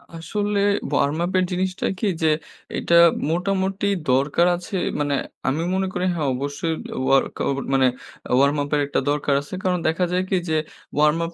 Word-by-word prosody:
আসলে 205 +5 -2 0.3
warm 145 +1 +1
up 180 - -3
এর 185 - +2
জিনিসটা 185 +1 -1
কি - - -1 0.2
যে - - +4 0.5
এটা 170 - +1 0.4
মোটামুটি 195 +3 0 0.2
দরকার 140 +6 +3
আছে। 180 +3 -7 0.2
মানে 145 -1 0 0.3
আমি 140 +4 +1
মনে 190 0 0
করি 180 +1 -1
হ্যা 160 - -2
অবশ্যই 145 +5 -2 0.3
ওয়ার্ক 135 0 +3
আউ - - +1 0.2
মানে 135 -1 +4 0.4
এ - - -17
ওয়ার্ম 140 +2 +3
আপ 145 - -6
এর 145 - +2
একটা 145 - 0
দরকার 145 -1 +1
আছে। 145 - -12
কারণ 180 -1 +1
দেখা 165 +3 +1
যায় 180 +1 +1
কি - - +1
যে 160 - +1 0.4
ওয়ার্ম 150 +1 +4
আপ 165 - -7
165 Hz, 180 wpm, -22 LUFS, 145-185 Hz, 0.5 s, যে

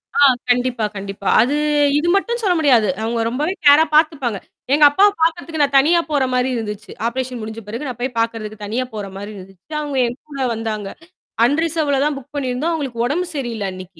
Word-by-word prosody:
ஆ - - +1 0.3
கண்டிப்பா, 245 -2 +1
கண்டிப்பா. 195 0 -6
அது 270 +5 +1 0.4
இது 325 +3 0
மட்டும் 470 +4 0
சொல்ல 370 -3 +3
முடியாது. 245 -8 +4 0.2
அவங்க 230 +1 -1
ரொம்பவே 300 +9 -1
கேரா 290 +2 +8
பார்த்துப்பாங்க. 285 -9 +2 0.4
எங்க 295 +1 +4
அப்பாவ 400 +7 +5
பார்க்கறதுக்கு 325 -1 0
நான் 280 0 0
தனியா 335 +5 +4
போற 285 -3 +2
மாரி 250 +1 +1
இருந்துச்சு. 210 -2 -5 0.2
ஆப்ரேஷன் 250 0 -4
முடிஞ்ச 220 +1 -6
பிறகு 235 +7 -5
நான் 245 -2 -6
போய் 255 0 -1
பார்க்கறதுக்கு 220 -2 -3
தனியா 240 +5 -2
போற 205 -2 -5
மாரி 205 +2 -7
இருந்துச்சு. 195 - -11
அவுங்க 290 -2 -4
என் 245 +3 -6
கூட 280 -2 -8
வந்தாங்க. 220 -2 -4 0.6
அன் 285 +5 +2
ரிசர்வ்ல 305 -4 0
தான் 300 -1 0
புக் 275 +2 -13
பண்ணியிருந்தோம் 275 +4 -1
அவங்களுக்கு 260 -7 -3
உடம்பு 340 +7 -1
சரியில்ல 235 -7 -3
அன்னைக்கு. 185 -2 -11
255 Hz, 185 wpm, -19 LUFS, 220-295 Hz, 0.6 s, கேரா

